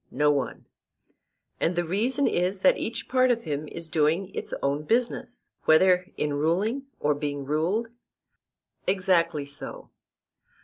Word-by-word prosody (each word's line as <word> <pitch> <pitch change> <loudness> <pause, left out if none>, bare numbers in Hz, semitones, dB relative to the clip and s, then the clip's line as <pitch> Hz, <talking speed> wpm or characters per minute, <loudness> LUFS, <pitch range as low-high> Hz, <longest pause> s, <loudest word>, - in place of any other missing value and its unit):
No 150 0 +2
one. 140 -2 -2 0.9
And 175 - +1
the 175 - +1
reason 235 - +1
is 185 +2 0
that 190 - +4
each 230 - -4
part 255 0 +3
of 235 -1 +1
him 150 -1 -3
is 165 +2 -7
doing 165 +5 +1
its - - -5
own 140 +1 +1
business, 245 - -1 0.2
whether 180 +3 +5
in 150 -1 -1
ruling 195 - 0
or 150 0 +2
being 145 -1 -4
ruled? 170 - 0 1.0
Exactly 175 -5 +2
so. 140 0 -6
175 Hz, 135 wpm, -26 LUFS, 150-210 Hz, 1.0 s, whether